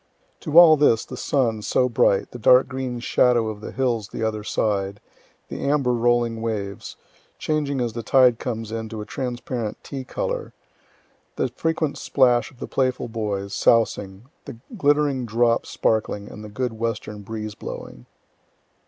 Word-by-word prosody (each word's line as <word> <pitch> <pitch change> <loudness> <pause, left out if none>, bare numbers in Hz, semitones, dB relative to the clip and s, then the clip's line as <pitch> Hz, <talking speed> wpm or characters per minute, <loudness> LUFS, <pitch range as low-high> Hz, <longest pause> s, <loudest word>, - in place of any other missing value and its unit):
To 155 +2 -1
all 165 -3 +9
this, 115 -6 +3
the - - -8
sun, 115 -6 0
so 125 +5 +1
bright, 110 -4 +2
the 125 - -8
dark 125 +3 +5
green 130 -2 -4
shadow 120 -2 +2
of 105 -1 -7
the - - -7
hills 120 -5 -1
the 115 - -5
other 110 -1 -2
side, 100 -2 -1 0.5
the - - -7
amber 140 -3 +2
rolling 120 -1 +1
waves, 100 -4 -4 0.4
changing 145 -3 -1
as 120 -3 -1
the 115 - -4
tide 125 +1 +4
comes 115 -3 -4
in 110 -1 -4
to 110 -1 -6
a - - -6
trans 125 0 -4
parent 115 -5 -4
tea 135 -2 -6
color - - -4 0.8
the - - 0
frequent 160 -2 -2
splash 120 -4 +2
of 130 - -21
the - - -6
playful 130 -2 -1
boys, 100 -3 -3
sousing 105 -4 +1 0.2
the 115 - -8 0.2
glittering 145 - +2
drops 115 +1 +1
sparkling, 105 -2 -1
and 105 - -10
the 105 - -8
good 125 +3 -3
western 110 -2 -3
breeze 110 +1 -6
blowing. - - -9
115 Hz, 160 wpm, -23 LUFS, 110-130 Hz, 0.8 s, all